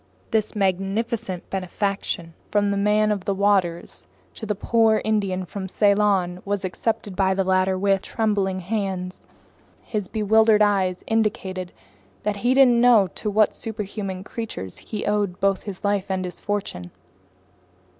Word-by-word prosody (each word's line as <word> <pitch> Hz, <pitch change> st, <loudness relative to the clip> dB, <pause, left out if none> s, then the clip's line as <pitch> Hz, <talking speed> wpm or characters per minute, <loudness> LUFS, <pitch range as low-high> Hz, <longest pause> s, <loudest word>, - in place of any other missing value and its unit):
This 220 Hz, -2 st, 0 dB
magnificent 195 Hz, +1 st, -1 dB
benefaction 190 Hz, -2 st, -2 dB, 0.2 s
from 205 Hz, -1 st, +2 dB
the -, -, 0 dB
Man 210 Hz, +1 st, +2 dB
of 200 Hz, -3 st, -2 dB
the 200 Hz, -, 0 dB
Waters 190 Hz, -4 st, 0 dB, 0.3 s
to 220 Hz, -, -8 dB
the 210 Hz, -, 0 dB
poor 220 Hz, +1 st, +3 dB
Indian 200 Hz, -4 st, 0 dB
from 190 Hz, +1 st, -6 dB
Ceylon 200 Hz, -3 st, +2 dB
was 200 Hz, -1 st, -2 dB
accepted 200 Hz, +1 st, -2 dB
by 190 Hz, 0 st, +2 dB
the 195 Hz, -, +1 dB
latter 185 Hz, 0 st, +2 dB
with 195 Hz, 0 st, +2 dB
trembling 200 Hz, -4 st, -1 dB
hands. 190 Hz, -2 st, -3 dB, 0.6 s
His 210 Hz, -5 st, -3 dB
bewildered 220 Hz, 0 st, +4 dB
eyes 190 Hz, -3 st, +1 dB
indicated 190 Hz, -5 st, -1 dB, 0.5 s
that 210 Hz, -1 st, -1 dB
he 245 Hz, +5 st, +1 dB
didn't 250 Hz, -3 st, +6 dB
know 230 Hz, -6 st, +6 dB
to 215 Hz, -, -3 dB
what 210 Hz, 0 st, +3 dB
superhuman 200 Hz, -4 st, -5 dB
creatures 200 Hz, -, -6 dB
he 215 Hz, -, -5 dB
owed 205 Hz, -3 st, 0 dB
both 195 Hz, 0 st, +1 dB
his 200 Hz, 0 st, -7 dB
life 200 Hz, -1 st, 0 dB
and 190 Hz, -1 st, -1 dB
his 180 Hz, -, -6 dB
fortune. 195 Hz, -, -4 dB
200 Hz, 145 wpm, -23 LUFS, 190-215 Hz, 0.6 s, didn't